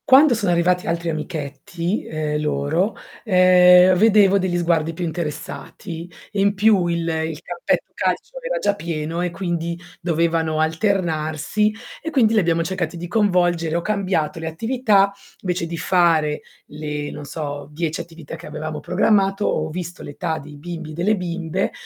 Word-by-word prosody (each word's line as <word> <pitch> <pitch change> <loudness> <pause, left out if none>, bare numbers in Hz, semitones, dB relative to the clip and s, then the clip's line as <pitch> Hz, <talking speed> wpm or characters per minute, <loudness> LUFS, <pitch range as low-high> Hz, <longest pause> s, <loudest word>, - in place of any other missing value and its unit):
Quando 275 +1 +7
sono 205 -5 0
arrivati 180 +1 +2
altri 170 0 -1
amichetti, 155 +4 -3
ehm, 150 -1 -2
loro, 150 +7 0 0.3
ehm, 180 -2 +7
vedevo 200 -1 +5
degli 180 -2 0
sguardi 165 -2 +1
più 175 +2 -3
interessati. 165 +1 -6 0.2
In 200 -1 +2
più 200 -3 +3
il 170 0 0
il 160 -1 -2
campetto 175 -1 -1
da - - -42
calcio - - -2
era - - -2
già 205 - +1
pieno, 165 -2 -3
e 180 - 0
quindi 170 -2 -3 0.2
dovevano 165 -2 +1
alternarsi, 160 +3 0 0.3
e 320 - -4
quindi 235 -8 +3
lì 220 - +5
abbiamo 170 -3 +2
cercati 175 -1 -3
di 175 +1 -5
coinvolgere. 175 -5 +2
Ho - - -1
cambiato 185 -6 -1
le 160 - -4
attività, 205 +2 +2 0.3
invece 180 -2 -1
di 165 0 -5
fare 165 -4 +2 0.3
le, 150 -1 -5
non 150 - -8
so 145 -1 -5
10 160 +1 -2
attività 165 -3 -9
che - - -10
avevamo 155 0 -5
programmato, 195 +1 +2
ho 155 0 0
visto 175 +2 -6
l'età 160 +2 -3
dei 150 0 -11
bimbi 165 0 -7
e - - -8
delle 180 +7 +1
bimbe 175 0 -2
170 Hz, 155 wpm, -21 LUFS, 160-190 Hz, 0.3 s, Quando